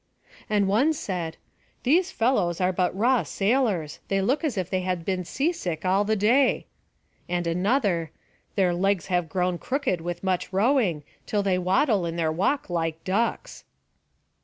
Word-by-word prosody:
And 205 -2 +2
one 250 +11 +3
said; 175 - -4 0.5
"These 345 +8 +3
fellows 210 - +1
are 185 0 +1
but 180 +1 0
raw 245 +3 +3
sailors; 200 - 0
they 195 - +1
look 255 - +1
as 280 -9 -1
if 185 -3 -1
they 185 0 -1
had 180 -2 -2
been 185 -2 -1
sea 275 - 0
sick 175 - -4
all 190 +2 +3
the 215 +1 +1
day." 240 +6 +3 0.6
And 175 0 -1
another: 180 - +1 0.5
"Their 185 -3 +2
legs 190 +1 +1
have 175 -2 +1
grown 180 0 -1
crooked 255 - -1
with 175 +1 -5
much 185 -1 -1
rowing, 200 - +2 0.2
till 205 -1 0
they 190 -2 +1
waddle 190 - +2
in 165 - -4
their 165 -2 0
walk 195 - 0
like 165 -2 -2
ducks." 230 - -2
190 Hz, 160 wpm, -25 LUFS, 175-230 Hz, 0.6 s, one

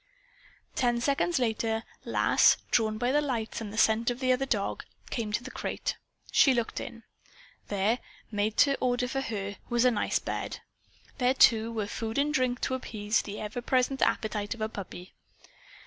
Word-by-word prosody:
Ten 240 -2 +1
seconds 280 +6 +1
later, 225 -2 0 0.2
Lass, - - +4
drawn 215 -2 +2
by 245 +3 +1
the 295 +2 +3
lights 235 -6 -3
and 215 - -5
by - - -10
the - - -7
scent 225 +1 +3
of 245 0 -3
the 255 -1 +2
other 260 +2 +1
dog, 210 -6 -1 0.3
came 225 -3 -2
to 220 +3 -1
the 260 - -8
crate. - - -3 0.4
She 265 -2 +5
looked 235 -2 -1
in. 230 -1 -8 0.6
There, 205 +4 +1 0.3
made 210 +1 -1
to 280 -1 +5
order 250 0 +1
for 270 +2 -2
her, 200 -5 -4
was 240 +1 +2
a 250 - +6
nice 210 - +1
bed. - - -4 0.6
There, 255 +1 +3
too, 225 -2 +5
were 220 -2 -2
food 225 +2 -4
and 290 +1 +2
drink 255 -2 +1
to 260 - -1
appease 215 -4 -1
the 205 0 -7
ever 215 +3 -4
present 255 +2 +1
appetite 210 -1 0
of 225 - -11
a 215 - 0
puppy. 190 -3 -8
230 Hz, 180 wpm, -29 LUFS, 215-255 Hz, 0.6 s, a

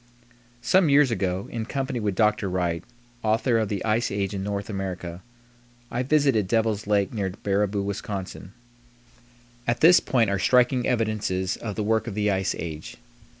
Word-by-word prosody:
Some 185 0 +4
years 140 -2 +5
ago, 95 -2 -1
in 115 -1 -4
company 135 -1 -2
with 105 -3 -1
Dr. 105 0 +2
Wright, 85 -2 -1 0.4
author 115 +2 +2
of 110 -2 -1
the 100 0 -3
"Ice 115 +2 +1
Age 100 0 -2
in 95 - -3
North 100 0 -3
America," 90 -3 -5 0.7
I 120 - -1
visited 135 -7 +2
Devil's 110 -1 0
Lake 100 0 +1
near 100 -4 -1
Baraboo, 100 +1 -1
Wis. 100 0 -3 1.7
At 120 0 0
this 175 +3 +8
point 115 -6 +1
are 100 - 0
striking 125 +2 +3
evidences 110 -5 -1
of 105 -4 -6
the 105 - -2
work 110 +1 +1
of 110 - -5
the 105 -1 +1
ice 95 -1 0
age. 80 -2 -7
105 Hz, 160 wpm, -25 LUFS, 95-115 Hz, 1.7 s, this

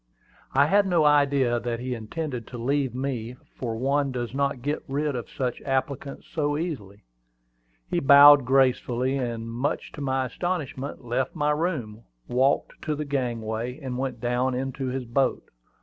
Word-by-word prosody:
I 140 +1 +6
had 200 +5 +3
no 170 -4 +3
idea 140 -4 +3
that 115 0 -3
he 125 +1 -3
intended 125 +2 -5
to 125 - -8
leave 130 +1 0
me, 125 -3 -3 0.2
for 115 -3 -2
one 140 +3 +1
does 120 -1 -4
not 140 -2 -1
get 145 +2 -1
rid 145 +1 -1
of 120 - -5
such 125 -2 -3
applicants 135 0 -3
so 145 -2 -1
easily. 125 - -5 0.8
He - - 0
bowed 140 +1 +9
gracefully, 130 0 +2
and 120 -4 -3
much 120 +5 -2
to - - -9
my 130 -1 0
astonishment, 145 -4 -4
left 125 +2 -1
my 150 0 +1
room, 150 -9 -2 0.3
walked 130 +3 +1
to 155 - -2
the 150 +1 -4
gangway, 120 -2 -3
and 130 -4 -5
went 130 -2 -3
down 125 +2 0
into 135 +1 -3
his 130 0 -3
boat. 130 +3 0
130 Hz, 160 wpm, -26 LUFS, 120-145 Hz, 0.8 s, bowed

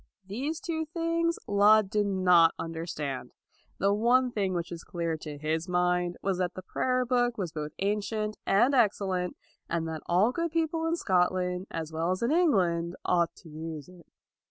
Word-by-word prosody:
These 265 +11 -3
two 320 -2 -3
things 335 +1 0
Laud 205 0 +5
did 210 -2 +1
not 180 -4 +4
under 165 0 -5
stand. 140 -5 -4 0.4
The 200 +1 +2
one 245 +4 +3
thing 195 -5 -1
which 170 0 -3
was 170 -1 -7
clear 170 -2 -2
to 150 -1 -8
his 160 +4 -2
mind 180 0 +1
was 190 -2 0
that 180 -1 -1
the 185 - -7
prayer 255 +6 0
book 245 -1 +1
was 180 -6 -3
both 150 -1 -4
ancient 210 +1 -1
and 240 +8 +4
excellent, 195 -7 +1 0.3
and 165 -1 -1
that 160 -1 -5
all 185 +7 +3
good 335 +4 -1
people 325 0 0
in 330 - +1
Scotland 180 - 0
as 160 -1 -5
well 165 +2 -1
as 185 +4 -1
in 235 - +1
England, 180 - +2
ought 170 -2 +2
to 165 - -12
use 155 -1 -7
it. 180 -3 -16
185 Hz, 180 wpm, -28 LUFS, 170-240 Hz, 0.4 s, Laud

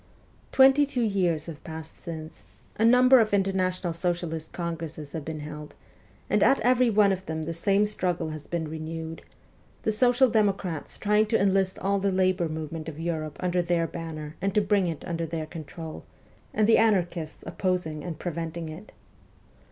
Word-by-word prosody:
Twenty 270 +2 +6
two 250 -3 0
years 180 -7 +1
have 160 -4 -9
passed 160 0 -9
since; 160 -2 -7 0.3
a 220 - 0
number 250 +2 +7
of 215 -2 +3
International 185 -2 0
Socialist 170 -2 -3
congresses 165 -4 -5
have 160 - -5
been 155 0 -5
held, 150 0 -8 0.5
and - - +2
at 270 - +5
every 250 +1 +4
one 210 -2 +4
of 190 0 -3
them 160 0 -3
the 165 +2 -3
same 195 +5 +2
struggle 180 -5 -1
has 155 -1 -8
been 170 -2 -2
renewed 160 +1 -6 0.6
the 220 - +2
social 245 +4 +4
democrats 195 -8 0
trying 210 +1 +2
to 225 +1 +2
enlist 195 -1 +2
all 200 +1 0
the 195 0 +1
labour 185 -2 +2
movement 155 0 -5
of 155 -1 -9
Europe 160 -3 -3
under 180 -1 +1
their 170 -1 +1
banner 160 -2 -6
and 195 -1 -1
to 210 - +5
bring 200 -2 +2
it 165 -3 -4
under 165 -1 -2
their 160 -1 -3
control, 160 0 -8 0.5
and 215 - +2
the 225 - +5
anarchists 175 -7 0
opposing 165 -2 -2
and 170 -4 -5
preventing 170 -1 -4
it. 170 +7 -10
175 Hz, 170 wpm, -27 LUFS, 160-200 Hz, 0.6 s, number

